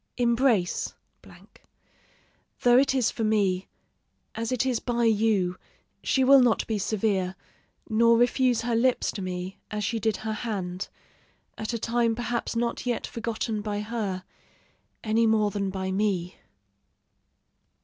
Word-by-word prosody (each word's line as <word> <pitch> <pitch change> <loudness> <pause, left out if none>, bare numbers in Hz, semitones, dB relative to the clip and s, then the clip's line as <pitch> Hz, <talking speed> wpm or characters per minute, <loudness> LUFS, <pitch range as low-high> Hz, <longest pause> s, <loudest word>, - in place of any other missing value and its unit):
Embrace; 235 -5 +1 1.7
though 245 0 +6
it 270 0 +2
is 250 -4 +2
for 225 - -4
me, 200 -4 +1 0.7
as 230 +1 -3
it 255 0 +1
is 255 -3 +1
by 240 -1 -1
you, 210 -5 +2 0.4
she 265 - +2
will 270 +1 +7
not 240 -3 +2
be 220 -2 -2
severe, 195 -3 0 0.5
nor 230 +1 +4
refuse 245 0 +3
her 235 0 -1
lips 250 +2 +2
to 200 - -6
me 185 0 -5
as 210 0 -3
she 225 +3 -1
did 220 -1 0
her 220 0 -3
hand, 195 -4 -4 0.7
at 220 - -4
a 235 - -2
time 230 0 +1
perhaps 240 0 -3
not 235 0 -1
yet 240 - -1
forgotten 225 -1 -3
by 205 -1 -3
her, 210 -4 -3 0.8
any 225 +1 +2
more 215 -2 +2
than 200 -1 -2
by 190 0 -3
me." 190 -3 -1
220 Hz, 140 wpm, -26 LUFS, 200-235 Hz, 1.7 s, will